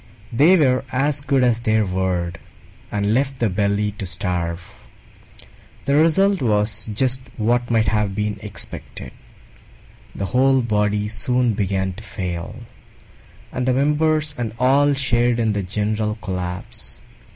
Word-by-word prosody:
They 155 +10 +6
were 130 -5 +3
as 140 +2 +1
good 135 -2 +1
as 120 -2 +3
their 110 -2 +2
word, 90 -2 -2 0.5
and 100 +1 0
left 135 +2 0
the 115 -5 0
Belly 100 +2 0
to 95 - -4
starve. 90 +1 -4 1.0
The 140 - +1
result 185 +6 +4
was 105 -1 0
just 130 +4 +2 0.2
what 120 +2 +1
might 115 -2 +2
have 105 -2 0
been 105 -1 -2
expected: 105 -2 -7 1.0
the 100 - -3
whole 130 +6 +3
Body 105 -2 0
soon 120 +2 +1
began 95 -2 -1
to 105 +5 -11
fail, 90 +3 -5 0.9
and 125 0 -2
the 130 - +3
Members 150 +2 +1
and 115 -3 -3
all 140 +3 +3
shared 120 -3 +2
in 110 -2 +1
the 105 - -1
general 105 +3 -1
collapse. 90 -3 -5
110 Hz, 135 wpm, -21 LUFS, 100-130 Hz, 1.0 s, They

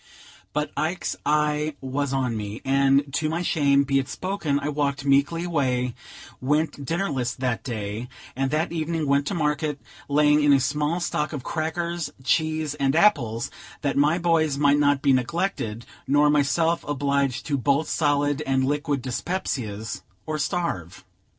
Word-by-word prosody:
But 150 0 -2
Ike's 170 +4 -1
eye 150 0 +1
was 135 +1 -2
on 130 -3 0
me, 105 0 -5
and, 135 +1 +3
to 155 +2 0
my 170 +3 -1
shame 140 -6 +3
be 135 0 +2
it 135 0 -4
spoken, 175 -7 -1
I 145 - -3
walked 140 -1 -1
meekly 140 +5 +2
away; 130 -7 0 0.5
went 145 +2 0
dinnerless 145 -5 -1
that 125 -3 -2
day, 110 0 -4 0.3
and 135 +1 0
that 155 +3 0
evening 165 -1 -1
went 140 0 +2
to 195 - -1
market, 150 -2 -1 0.3
laying 150 +1 +4
in 145 -1 +5
a 135 - +5
small 150 +5 0
stock 150 -3 -1
of 140 -4 -5
crackers, 170 +1 -2
cheese 155 +1 +1
and 140 -1 0
apples, 120 - +2 0.3
that 140 - 0
my 150 +4 +3
boys 165 -4 +2
might 145 0 +4
not 145 -1 +2
be 140 -2 +5
neglected, 130 - -1 0.2
nor 145 +1 +4
myself 160 +3 +2
obliged 140 -2 0
to 145 - 0
bolt 140 +3 +1
solid 145 -1 +1
and 135 -2 +1
liquid 145 -1 -1
dyspepsias, 115 - -3 0.2
or 155 0 -3
starve. 95 - -3
145 Hz, 155 wpm, -24 LUFS, 135-155 Hz, 0.5 s, in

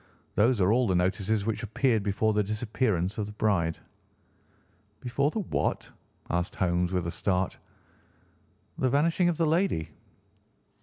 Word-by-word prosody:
Those 115 +2 +3
are 95 +1 +3
all 125 +1 +3
the 95 - +1
notices 95 +3 0
which 110 -1 -1
appeared 115 +1 +1
before 105 +2 +1
the 105 - +2
disappearance 105 -2 -1
of 105 - -2
the - - -7
bride." 85 -7 +1 1.2
"Before 140 +3 0
the 215 - -2
what?" 185 - -2 0.4
asked 85 +1 -1
Holmes 90 -1 +1
with 90 -2 -1
a 85 - -2
start. 95 0 -1 1.2
"The 130 - +2
vanishing 165 +6 +2
of 170 - -1
the 165 - +2
lady." 160 - +1
105 Hz, 145 wpm, -28 LUFS, 95-130 Hz, 1.2 s, Those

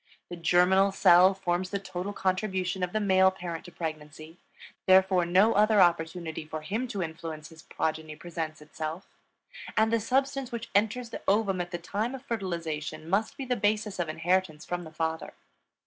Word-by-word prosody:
The 175 - -5
germinal 180 +3 +4
cell 185 0 +6
forms 180 -1 -1
the 200 - -1
total 190 0 -5
contribution 190 -1 -1
of 180 -1 -1
the 215 - 0
male 190 -2 +4
parent 175 -3 -6
to 175 - -11
pregnancy; 155 0 -7 0.5
therefore 185 -2 +5
no 190 +6 +4
other 210 +1 +4
opportunity 170 -2 +1
for 155 0 -6
him 225 +9 -2
to 205 -6 -3
influence 160 -1 -7
his 160 -1 -14
progeny 155 -1 -3
presents 160 -2 -6
itself, 155 +3 -6 0.7
and 220 +1 +3
the 230 - +3
substance 265 +3 0
which 235 -1 -6
enters 220 +4 +1
the - - -6
ovum 195 -2 +2
at 175 - -5
the 175 - -4
time 210 +8 -3
of 265 +1 -11
fertilization 165 - -4
must 195 +5 0
be 270 - -4
the 250 -1 0
basis 210 -2 0
of 170 -2 -1
inheritance 165 -1 0
from 175 -1 -4
the 160 - -10
father. 160 0 -3
180 Hz, 175 wpm, -28 LUFS, 165-205 Hz, 0.7 s, cell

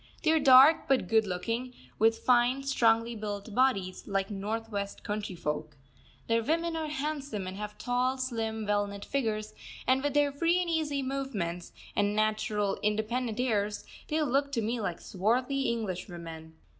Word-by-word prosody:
They 315 - +4
are 320 - +4
dark 275 +2 +7
but 265 -9 +2
good 220 +1 +3
looking, 230 +7 -3 0.2
with 225 +1 +4
fine, 250 +2 +4
strongly 230 -3 +2
built 205 0 -5
bodies, 200 -7 +1
like 195 0 -1
north 220 +3 -4
west 200 -1 -4
country 205 -2 -3
folk. 150 -2 -4 0.5
Their 230 0 +2
women 330 +6 0
are 320 -1 -2
handsome, 285 -8 -3
and 185 0 -5
have 210 0 -6
tall, 250 +1 0
slim, 225 -4 -2
well 205 0 +1
knit 200 0 -8
figures; 220 -6 -2 0.3
and 260 +1 +3
with 290 0 -1
their 290 -1 +4
free 335 +5 +2
and 350 -2 -1
easy 295 -4 0
movements, 220 -11 -3 0.2
and 205 0 +1
natural 215 -1 0
independent 220 +2 -1
airs, 210 -4 0 0.2
they 310 - 0
look 280 +1 +1
to 235 - +1
me 230 +3 -1
like 180 -5 -3
swarthy 250 +8 0
Englishwomen. 175 -7 -5
225 Hz, 160 wpm, -30 LUFS, 205-270 Hz, 0.5 s, dark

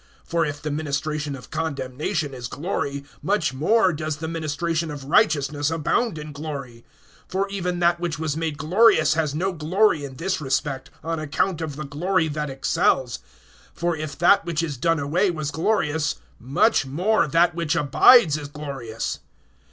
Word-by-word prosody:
(9)For 165 -2 +1
if 145 0 -6
the 150 - -2
ministration 150 0 -2
of 125 - -12
condemnation 145 -2 -2
is 125 -2 -6
glory, 140 -2 -3 0.2
much 190 -9 0
more 185 +7 +3
does 155 0 -3
the 160 +1 -5
ministration 165 +1 -2
of 145 -2 -6
righteousness 145 -4 +2
abound 165 +6 0
in 150 0 -7
glory. 140 -6 -7 0.5
(10)For 195 +1 0
even 180 -3 -2
that 175 0 +2
which 170 -3 -2
was 155 -2 -2
made 160 -2 -2
glorious 155 -1 +4
has 155 -2 -1
no 185 +4 -1
glory 165 0 +2
in 135 -2 -7
this 185 +4 -2
respect, 135 -1 -2
on 165 0 -2
account 155 +3 -1
of 155 -3 -4
the 150 0 -5
glory 160 +4 0
that 150 -1 -3
excels. 135 -2 +1 0.6
(11)For 170 0 0
if 155 -2 -5
that 175 +4 +5
which 165 -1 -1
is 150 -4 -3
done 165 +5 +1
away 160 +8 +1
was 155 -4 -3
glorious, 160 -3 0 0.2
much 140 - +2
more 170 +8 +1
that 170 +4 +3
which 165 -2 -1
abides 155 - +6
is 145 - -7
glorious. 135 -7 -5
155 Hz, 165 wpm, -23 LUFS, 145-170 Hz, 0.6 s, abides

